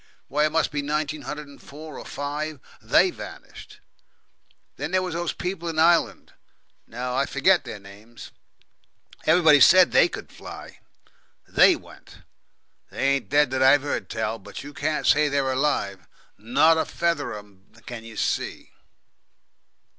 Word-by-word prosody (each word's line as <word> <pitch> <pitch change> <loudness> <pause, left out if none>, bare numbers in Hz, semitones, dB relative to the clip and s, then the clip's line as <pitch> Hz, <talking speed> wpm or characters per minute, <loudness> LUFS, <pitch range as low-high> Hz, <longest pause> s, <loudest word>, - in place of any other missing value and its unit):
Why, 150 +2 +2
it - - -6
must 165 0 +1
be 145 -1 -2
nineteen 150 +1 -2
hundred 150 0 -7
and 140 - -16
four, 150 +1 -11
or - - -10
five, 145 +1 -5 0.2
THEY - - +3
vanished! - - -12 0.9
Then 145 +3 -4
there 185 +1 +1
was 180 -2 -4
those 170 0 -2
people 180 -2 -5
in 160 - -5
Ireland 165 +1 +2 0.5
no, 125 +2 -5
I 135 +1 +1
forget 175 +7 +2
their - - -7
names. 105 +4 -14 1.0
Everybody 160 -2 +6
said 185 +6 +7
they - - +5
could - - -9
fly. - - -11 0.7
THEY - - +5
went. - - -16 0.7
They 135 - -1
ain't 140 0 -1
dead 145 -2 +3
that 130 0 -1
I've 135 +2 +5
heard 145 - -3
tell; 110 0 -3
but 100 +5 -10
you 145 +1 -10
can't 150 +2 -2
say 150 +1 +4
they're 140 -1 0
alive. 100 - -1 0.3
Not 155 +9 +3
a - - 0
feather 170 -4 -2
of - - -6
'em 95 -2 -27
can 120 -2 -8
you 115 -1 -11
see. - - -3
145 Hz, 155 wpm, -24 LUFS, 125-155 Hz, 1.0 s, said